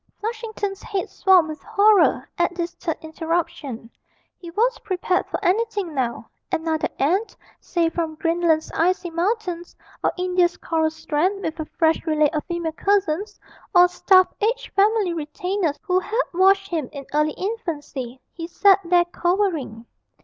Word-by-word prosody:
Flushington's 435 -3 -4
head 395 +2 -4
swam 375 -5 +4
with 310 0 -7
horror 410 -1 +3
at 345 0 0
this 345 0 -3
third 325 -3 -4
interruption; 315 -7 -3 0.5
he 345 - -11
was 460 +8 +1
prepared 365 -2 -1
for - - -3
anything 405 -3 0
now 250 -4 -2 0.2
another 320 -1 0
aunt, 370 +11 0 0.2
say 340 -2 0
from 330 -1 -3
Greenland's 330 -1 +1
icy 355 +1 +1
mountains, 355 -1 -2 0.3
or - - +3
India's 360 -1 +1
coral 320 -1 0
strand, 330 +5 -1
with 320 +1 -4
a 315 - -2
fresh 320 +1 +1
relay 305 -1 +3
of 305 -2 -2
female 340 -2 -3
cousins, 395 +1 0 0.4
or 355 0 +9
a - - 0
staff 370 +1 +5
of - - -30
aged 475 +4 -1
family 405 -2 +3
retainers 335 +1 -2
who 370 -2 +2
had 430 +5 -3
washed 390 +2 +4
him 315 -7 -2
in 280 -2 -8
early 300 0 +2
infancy: 295 - -5
he 330 -1 -6
sat 390 +2 +4
there 350 0 +3
cowering. 345 - -1
350 Hz, 150 wpm, -22 LUFS, 320-390 Hz, 0.5 s, or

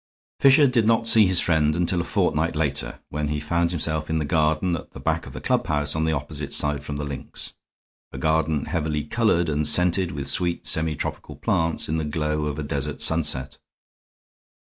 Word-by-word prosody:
Fisher 140 +2 +6
did 120 -5 +2
not 115 0 +2
see 110 -3 +6
his 90 -2 +2
friend 75 -2 +2
until 85 0 0
a - - -3
fortnight 80 0 0
later, 75 -5 -2
when 75 0 -2
he 75 0 -2
found 85 +3 0
himself 80 -2 -1
in 80 - 0
the 75 - -1
garden 80 +3 +1
at 80 - -9
the - - -9
back - - -1
of - - -10
the - - -6
clubhouse 75 -1 0
on 80 0 0
the 80 - +1
opposite 75 -1 -4
side 75 -1 -1
from 75 0 -5
the 75 - -4
links, 70 -1 -6 0.6
a - - -8
garden 80 +1 0
heavily 75 -2 -2
colored 85 -1 +1
and 75 -1 0
scented 90 +3 +3
with 70 -2 -4
sweet 85 +5 0
semitropical 80 -2 -1
plants 80 0 0
in 80 - -1
the 80 - -2
glow 75 0 -2
of 75 - -4
a 75 - -3
desert 70 -1 -3
sunset. 70 -5 +1
80 Hz, 190 wpm, -24 LUFS, 75-85 Hz, 0.6 s, Fisher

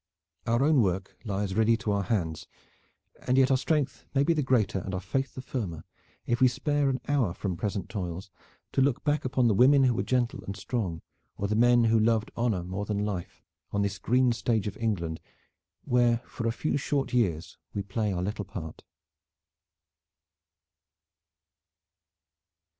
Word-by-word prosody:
Our 120 +3 +2
own 150 -3 +4
work 95 -1 -1
lies 100 -2 -2
ready 110 +2 +3
to 105 -1 -2
our 100 0 +1
hands; 90 -6 -2 0.8
and 125 - +3
yet 135 0 +5
our 130 - +5
strength 145 +2 -1
may 135 - +4
be 170 - +3
the 155 - 0
greater 115 -8 +1
and 95 +1 -4
our - - -2
faith 120 +8 -2
the 130 - -6
firmer 90 - -4 0.4
if 120 +1 0
we 130 - +8
spare 145 +2 +1
an 130 -1 -1
hour 130 - +1
from 95 -4 -3
present 100 +2 -3
toils 95 -1 -5 0.4
to - - +1
look 135 -2 +1
back 150 -1 0
upon 130 -1 +2
the 110 - +3
women 135 +6 +6
who 125 -2 +4
were 115 - -1
gentle 125 -2 0
and 100 +1 -6
strong, 95 -6 -3 0.3
or 100 - -1
the 105 - 0
men 120 +1 +5
who 115 0 +4
loved 110 0 +2
honor 115 -7 0
more 95 +3 -4
than 105 0 -1
life, 95 -5 -5 0.3
on 100 0 0
this 100 -1 -2
green 125 +5 +3
stage 115 -3 0
of 105 -1 -4
England 85 -8 -2 0.6
where 120 -1 +2
for 115 - -4
a - - +2
few 150 +5 -1
short 140 -2 -1
years 90 -10 0 0.2
we 100 - -1
play 105 +2 -1
our 90 -1 -2
little 105 +1 -3
part. 80 -5 -8
110 Hz, 175 wpm, -28 LUFS, 95-125 Hz, 0.8 s, we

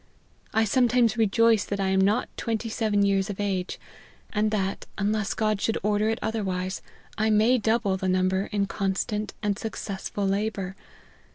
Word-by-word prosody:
I 220 - +3
some 245 +4 +3
times 235 -2 +3
rejoice 225 0 +3
that 200 - -4
I 195 -1 +1
am 190 0 +3
not 205 +5 +2
twenty 225 0 -2
seven 215 -3 +1
years 195 0 +1
of 205 - -5
age; 190 -3 -2 0.5
and 215 +1 +2
that, 195 -2 -2
unless 210 0 0
God 215 -2 0
should 225 - +1
order 210 +1 +2
it 225 - 0
other 220 0 -1
wise, 185 0 -3 0.4
I 220 +1 +2
may 220 +4 +4
double 220 -3 +1
the 190 0 -1
number 185 +1 +1
in 205 -1 +1
constant 200 +2 -2
and 205 -1 0
successful 200 -2 -4
labour. 195 -1 -1
205 Hz, 170 wpm, -26 LUFS, 195-220 Hz, 0.5 s, may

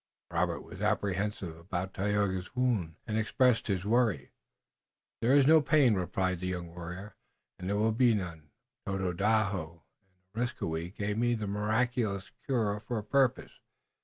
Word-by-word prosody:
Robert - - 0
was - - -11
apprehensive 100 -3 -1
about 90 +2 -4
Tayoga's 100 0 -1
wound 115 -11 0
and 110 -1 -1
expressed 115 +1 +2
his 95 -4 0
solicitude. 110 - +1 0.9
"There 125 +4 +4
is 140 -2 +6
no 160 +2 +7
pain," 145 -5 +4
replied 90 -1 -1
the 90 - -3
young 90 -2 -4
warrior, 90 +4 -7 0.5
"and 90 +1 -4
there 100 - +1
will 110 +2 +3
be 120 0 +4
none. 85 -6 -5 0.4
Tododaho 95 -3 0 0.5
and 115 +3 0
Areskoui 85 -7 -3
gave 105 0 -2
me 120 0 +2
the 110 -2 -3
miraculous 105 0 0 0.2
cure 110 -6 +1
for 115 +2 -4
a 105 - -3
purpose. 135 +2 +1
105 Hz, 145 wpm, -31 LUFS, 90-115 Hz, 0.9 s, no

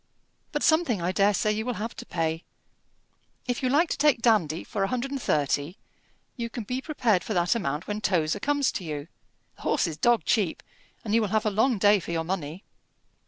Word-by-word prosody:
But 295 - -2
something 315 - +3
I 175 +2 -1
dare 200 +2 +3
say 210 +2 +1
you 215 +1 -1
will 250 0 -3
have 225 +3 -5
to 245 - -8
pay: 165 -1 -2 1.0
if 245 -1 -1
you 255 - +1
like 305 +6 +3
to - - -1
take 290 -4 +4
Dandy 175 -9 +2
for 200 - -4
a 195 - +2
hundred 255 +4 -2
and 275 -2 -3
thirty, 145 - 0 0.6
you 235 -2 -4
can 235 0 -5
be 250 +5 -3
prepared 240 - +1
for 215 - -3
that 175 0 +3
amount 150 -9 -2
when 210 0 -3
Tozer 175 -2 +1
comes 285 +2 +1
to - - -5
you. 150 -2 -5 0.5
The - - -16
horse - - +1
is 160 -3 -4
dog 240 +3 +2
cheap, 200 -8 +1 0.4
and 210 - -2
you 230 - +4
will 215 - 0
have 215 +2 0
a 215 - +2
long 225 +4 +2
day 205 +1 +5
for - - -9
your 165 -1 -1
money." 170 0 -4
210 Hz, 215 wpm, -26 LUFS, 170-245 Hz, 1.0 s, day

